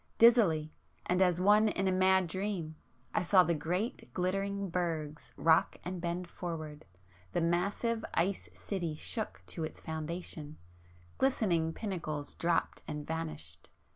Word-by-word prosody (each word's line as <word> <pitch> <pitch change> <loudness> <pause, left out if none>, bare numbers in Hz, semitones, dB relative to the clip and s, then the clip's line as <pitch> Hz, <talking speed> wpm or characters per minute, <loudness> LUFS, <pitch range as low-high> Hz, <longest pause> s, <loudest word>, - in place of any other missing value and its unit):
Dizzily, 195 -10 +5 0.3
and 180 +1 +2
as 180 -2 +4
one 210 +3 +5
in 195 -2 0
a - - +3
mad 185 0 +4
dream 180 -2 -3 0.4
I - - +2
saw 185 +1 +6
the 170 - +1
great 180 - -2
glittering 195 +1 -1
bergs 160 -3 -2
rock 160 0 +4
and 180 0 -4
bend 175 +1 -2
forward,—the 150 - -6
massive 200 +7 0
ice 185 +3 0
city 175 -6 -3
shook 220 +7 -4
to 165 - -4
its 155 - -5
foundations,... 160 -1 -5 0.6
glistening 185 -12 +2
pinnacles 160 -7 -4
dropped 170 0 0
and 150 0 -4
vanished 155 - -5
175 Hz, 130 wpm, -32 LUFS, 160-190 Hz, 0.6 s, saw